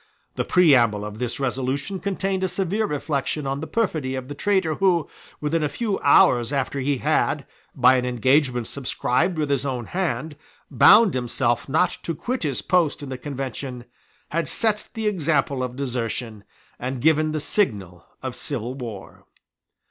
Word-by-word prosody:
The - - -1
preamble 120 - +4
of 105 +1 -7
this 125 0 -2
resolution 135 +7 -2
contained 195 -1 -2
a - - +2
severe 195 +4 -1
reflection 150 -1 -2
on 135 +1 -2
the 160 - -5
perfidy 155 -12 -1
of 130 0 -6
the - - -4
traitor 190 0 +1
who, 180 -5 +2 0.3
within 155 +2 0
a 150 - 0
few 205 +6 -2
hours 125 -3 +4
after 140 0 -1
he 135 +1 0
had, - - 0 0.3
by 130 0 +5
an 125 - -1
engagement 125 0 +2
subscribed 140 +6 -1
with 150 -2 -1
his 140 -2 +1
own 130 -4 -3
hand, 160 -3 -3 0.3
bound 220 -4 +7
himself 120 0 -1
not 160 +6 +1
to 165 - -3
quit 250 - -3
his 145 -5 -2
post 165 -5 +1
in 140 - -7
the 130 - -4
Convention, 130 -2 -5 0.4
had 165 -1 -1
set 215 -2 0
the 220 -1 -3
example 150 -8 0
of 125 -1 -3
desertion, 120 -5 -3 0.3
and 130 +1 -3
given 155 +2 +3
the 155 - -2
signal 100 - -1 0.2
of 130 -2 -4
civil 125 -3 -3
war. 115 -7 -9
140 Hz, 165 wpm, -23 LUFS, 125-165 Hz, 0.4 s, bound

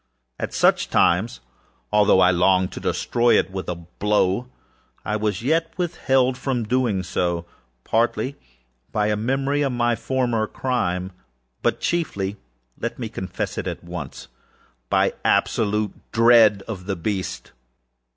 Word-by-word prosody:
At - - -3
such - - +2
times, 105 +8 +2 0.5
although 105 -2 +5
I 90 0 +6
longed 95 +1 +3
to - - -7
destroy 120 0 +2
it - - 0
with 95 -1 -5
a 90 - -2
blow, 100 +6 0 0.6
I 105 - -1
was 110 +1 -1
yet 165 +5 +1
withheld 130 -7 +1
from 130 -3 -1
so - - -6
doing, 95 -8 0 0.4
partly 115 - 0 0.6
by 105 0 +1
a 105 - +2
memory 135 +6 0
of 135 -3 0
my 120 -1 +1
former 120 -4 0
crime, 95 -9 -2 0.5
but - - +1
chieflyâlet 95 - -4
me - - -4
confess 95 -1 -4
it - - -4
at - - -5
onceâby 65 -6 -4
absolute 105 -1 +1 0.2
dread 115 -3 +5
of 95 -4 -6
the 100 - -1
beast. 95 +2 -4
105 Hz, 130 wpm, -23 LUFS, 95-125 Hz, 0.6 s, I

